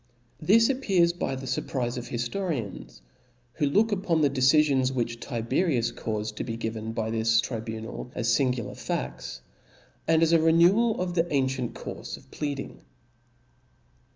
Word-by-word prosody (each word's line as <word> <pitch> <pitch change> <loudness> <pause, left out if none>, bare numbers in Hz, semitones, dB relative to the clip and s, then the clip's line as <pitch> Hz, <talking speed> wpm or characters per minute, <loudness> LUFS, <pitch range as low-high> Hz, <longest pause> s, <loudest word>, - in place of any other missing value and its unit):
This 225 +8 +5
appears 195 -11 +2
by 175 -6 -2
the 130 0 -7
furprize 125 -1 -2
of 125 -1 -5
hiftorians, 120 - -4 0.5
who 150 +1 0
look 215 +10 +3
upon 185 -5 +1
the 145 - +4
decifions 135 -1 +4
which 120 -2 -2
Tiberius 120 +1 0
caufed 110 -2 -4
to - - -2
be 115 -2 -4
given 110 -1 -4
by 110 0 -2
this 115 0 +3
tribunal, 110 0 -4
as 120 - -2
iingular 125 -5 0
fads, - - -4 0.7
and 160 0 +4
as 165 - +3
a 165 -1 +5
renewal 175 +8 +4
of 180 -1 -1
the 170 0 0
ancient 130 -3 0
courfe - - -7
of - - -20
pleading. 140 -2 -5
130 Hz, 145 wpm, -27 LUFS, 115-165 Hz, 0.7 s, This